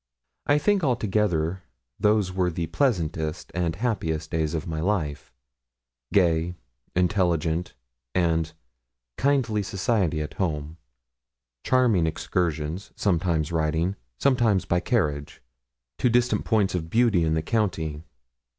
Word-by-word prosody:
I 145 - +5
think 195 +5 +2
altogether 100 - +1 0.4
those 105 -2 +2
were 90 -1 +1
the 85 0 -2
pleasantest 80 - -1
and 85 -2 -1
happiest 85 -8 -2
days 80 0 0
of 80 - -3
my 80 -2 -3
life: 80 -7 -1 0.8
gay, 85 -2 +2 0.4
intelligent, 85 -3 +1 0.4
and 80 -3 +1 0.7
kindly 130 -7 +2
society 100 -4 0
at 75 0 -5
home; 80 -3 -3 0.9
charming 115 -10 +3
excursions 80 +1 -2
sometimes 85 -4 +1
riding 80 +3 0 0.2
sometimes 115 - +2
by 90 - +1
carriage 75 - -1 0.6
to 125 - +3
distant 120 +1 +2
points 105 -4 +2
of 80 -3 -3
beauty 110 -4 +3
in 80 0 +1
the 80 - 0
county. 80 -8 -1
90 Hz, 115 wpm, -25 LUFS, 80-105 Hz, 0.9 s, I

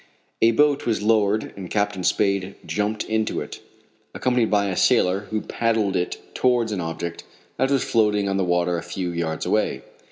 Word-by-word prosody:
A 115 - +6
boat 145 +4 +2
was 110 -3 0
lowered 105 -1 +2
and 95 -3 -8
Captain 100 -3 -1
Spade 100 0 +1
jumped 105 +1 -1
into 110 0 -1
it, - - -7 0.6
accompanied 125 -3 +1
by 100 -1 +2
a 95 - -2
sailor, 95 +4 +2
who 110 -1 -1
paddled 110 -4 0
it 90 -1 -1 0.2
towards 120 -3 +2
an 100 -3 -2
object 85 +1 -5 0.3
that 130 +2 +1
was 140 -2 +2
floating 105 -3 +2
on 95 0 0
the 95 - +1
water 90 -1 +1
a - - -7
few 90 +1 -4
yards 85 -2 -3
away. - - 0
105 Hz, 180 wpm, -23 LUFS, 90-110 Hz, 0.6 s, A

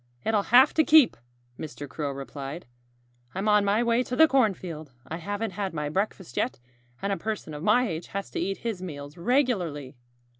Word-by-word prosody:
"It'll 215 -2 +1
have 255 +4 +7
to 315 - +4
keep," 305 -5 +6 0.4
Mr. 145 -1 -7
Crow 145 +1 -4
replied. 140 +4 -7 0.7
"I'm 195 +3 -2
on 210 -1 +5
my 205 +3 +2
way 235 +1 +2
to 250 0 -3
the 320 +5 +7
cornfield. 185 - 0
I 160 - -4
haven't 205 +5 -3
had 195 -2 -4
my 150 -1 -2
breakfast 190 - -3
yet. - - -1 0.4
And 200 0 +1
a - - -2
person 210 -4 -4
of 150 - -6
my 225 +7 +3
age 165 -3 -5
has 200 0 -5
to - - -3
eat 195 0 -1
his 220 -6 -2
meals 145 -4 -7
regularly." 175 - 0
195 Hz, 185 wpm, -27 LUFS, 155-225 Hz, 0.7 s, have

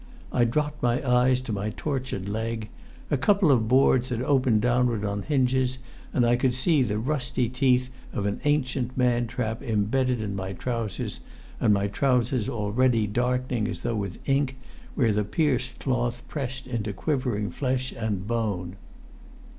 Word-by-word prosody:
I 120 - +3
dropped 150 +5 -1
my 120 +1 +2
eyes 125 +1 +4
to 125 -4 -4
my 100 +1 -2
tortured 130 -9 -3
leg: 110 +1 -3 0.4
a 145 - +3
couple 190 +4 +4
of 115 -5 +3
boards 130 0 +4
had 120 -1 -2
opened 130 -5 +3
downward 120 -2 +2
on 100 0 -2
hinges, 130 -2 +1 0.3
and 120 - +2
I 120 +1 +4
could 125 -1 +1
see 150 +2 +3
the 105 -4 0
rusty 125 0 0
teeth 125 0 +2 0.2
of 100 - -2
an 100 0 -2
ancient 130 -4 0
man 120 -2 +2
trap 115 -1 -3
embedded 125 +2 +1
in 105 -2 -3
my 95 0 -4
trousers, 115 0 -3 0.4
and - - +3
my 100 -1 +2
trousers 125 +1 +1
already 115 +1 +1
darkening 125 +1 0
as - - -5
though 120 - -1
with 100 -3 -3
ink, 135 -1 +1 0.4
where 115 -6 +3
the 105 +1 +1
pierced 130 +1 0
cloth 120 -2 -1
pressed 130 -3 -4
into 115 -5 -3
quivering 125 -4 -1
flesh 130 -1 -1
and 105 -4 -2
bone. 100 -5 -2
125 Hz, 160 wpm, -26 LUFS, 110-130 Hz, 0.4 s, eyes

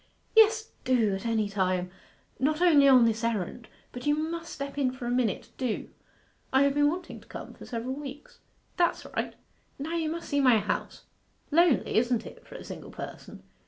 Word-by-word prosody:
'Yes, 445 0 +5
do 240 -6 +2
at 195 +4 -3
any 220 -2 +1
time; 185 -2 -1 0.5
not 300 +4 +1
only 310 -6 +6
on 255 -3 +7
this 225 0 0
errand. 225 0 -2 0.2
But 250 +3 -7
you 295 - +4
must 330 +2 -4
step 280 0 -5
in 260 -2 +2
for 255 -1 -8
a 240 - -1
minute. 245 -5 0
Do.' 250 -5 -2 0.6
'I 265 +1 +5
have 280 0 +3
been 290 0 +4
wanting 355 +3 -5
to - - -20
come - - -8
for - - -12
several 245 +2 -3
weeks.' 285 +1 -9 0.4
'That's 345 -1 +1
right. - - -2 0.4
Now 305 +4 -4
you 320 -2 0
must 335 +1 -5
see 285 -1 +1
my 250 -4 +6
house 210 0 -3 0.5
lonely, 335 -6 +3
isn't 240 0 +2
it, - - -12
for - - -12
a - - -8
single - - -8
person? - - -9
265 Hz, 190 wpm, -28 LUFS, 230-305 Hz, 0.6 s, on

